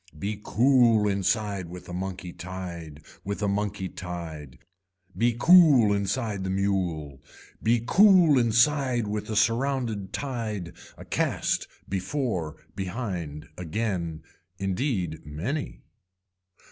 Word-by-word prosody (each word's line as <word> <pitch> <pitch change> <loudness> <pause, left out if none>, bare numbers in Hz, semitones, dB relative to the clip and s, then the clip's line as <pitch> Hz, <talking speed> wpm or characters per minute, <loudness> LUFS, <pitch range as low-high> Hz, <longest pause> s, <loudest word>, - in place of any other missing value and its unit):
Be 100 +5 -4
cool 120 -4 +4
inside 100 -1 0
with 90 +1 -9
a 90 - -7
monkey 90 -1 -5
tied, 85 -5 -7 0.2
with 100 +1 -4
a - - +2
monkey 100 -1 -1
tied. 85 -7 -7 0.6
Be 120 0 +2
cool 150 - +7
inside 100 0 -1
the 95 - -2
mule. 90 -8 -1 0.4
Be 115 +1 +2
cool 180 - +6
inside 120 +1 +3
with 105 +1 -3
a 110 - -2
surrounded 115 -4 0
tied, 110 -11 -4 0.2
a - - -11
cast, - - 0 0.2
before, 95 - -2 0.2
behind 90 - -4
again, 85 -3 -3 0.3
indeed, 95 - -2
many. 85 - -4
100 Hz, 110 wpm, -26 LUFS, 90-120 Hz, 0.6 s, cool